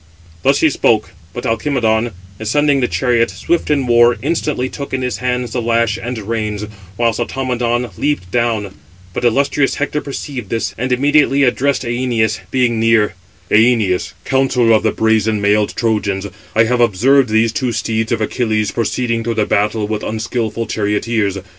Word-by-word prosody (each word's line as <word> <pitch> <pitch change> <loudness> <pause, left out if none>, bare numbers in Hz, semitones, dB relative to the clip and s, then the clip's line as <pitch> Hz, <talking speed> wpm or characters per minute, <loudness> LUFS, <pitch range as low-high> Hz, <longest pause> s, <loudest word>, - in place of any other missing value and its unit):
Thus 135 +7 +2
he 160 - +4
spoke, 110 -7 +1 0.2
but - - -6
Alcimedon, 115 -2 0 0.3
ascending 140 +6 +2
the 125 - +2
chariot, 120 -3 +1
swift 170 -1 -1
in 140 -3 +1
war, 120 0 +4
instantly 150 -4 -1
took 140 0 -5
in 130 - -3
his 125 -5 -2
hands 125 -1 -2
the 125 - -2
lash 115 -1 +1
and 120 +1 -4
reins, 105 -1 -3 0.3
whilst 115 -1 +1
Automedon 120 -1 -1
leaped 140 -12 -1
down; 110 -4 0 0.4
but - - -4
illustrious 135 +3 +2
Hector 145 +1 -2
perceived 135 -5 -6
this, 115 - -2
and 125 +2 -3
immediately 140 +1 +3
addressed 135 +2 +1
Æneas, 120 -3 0
being 125 -3 +1
near: 115 -2 +3 0.4
"Æneas, 110 -5 +2
counsellor 130 -3 +2
of 110 - +4
the 110 - +1
brazen 110 -1 +1
mailed 105 +1 +1
Trojans, 105 -4 -1 0.3
I 110 - +5
have 120 +2 +1
observed 120 +4 +3
these 110 +1 +2
two 130 -5 -1
steeds 110 0 -2
of 115 -2 0
Achilles 110 -1 0
proceeding 115 0 -1
through 115 0 -2
the 105 -1 +1
battle 105 +1 0
with 105 0 -3
unskilful 110 +1 -3
charioteers. 105 -1 -1
115 Hz, 160 wpm, -17 LUFS, 110-125 Hz, 0.4 s, I